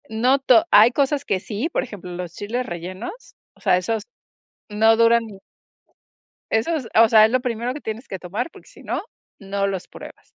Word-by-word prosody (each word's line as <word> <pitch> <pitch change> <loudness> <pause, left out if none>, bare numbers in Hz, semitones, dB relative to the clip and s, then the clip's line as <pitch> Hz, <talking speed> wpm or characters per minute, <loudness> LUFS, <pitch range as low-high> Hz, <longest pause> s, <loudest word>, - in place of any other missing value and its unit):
No 245 +5 +2
to 250 -4 +4
hay 220 +3 +7
cosas 280 +2 0
que 190 - 0
sí, 215 - -4
por - - -1
ejemplo, 200 -6 -9
los 175 -1 -6
chiles 235 +7 -4
rellenos, 185 - -8 0.2
o - - -25
sea, 190 -3 +3
esos 220 +5 -2 0.7
no 220 +2 +4
duran 230 0 +4
ni 205 -3 -12 1.1
esos, 255 +3 0
ah, 225 - +7
o 225 - +4
sea, 220 -1 +7
es 220 - 0
lo 255 - +2
primero 245 0 -3
que 295 - -7
tienes 225 0 -7
que 190 - -5
tomar, 185 - -4
porque - - -17
sí - - -16
no, - - -3 0.4
no 200 0 -2
los 190 -2 -4
pruebas. - - -13
220 Hz, 195 wpm, -22 LUFS, 195-245 Hz, 1.1 s, hay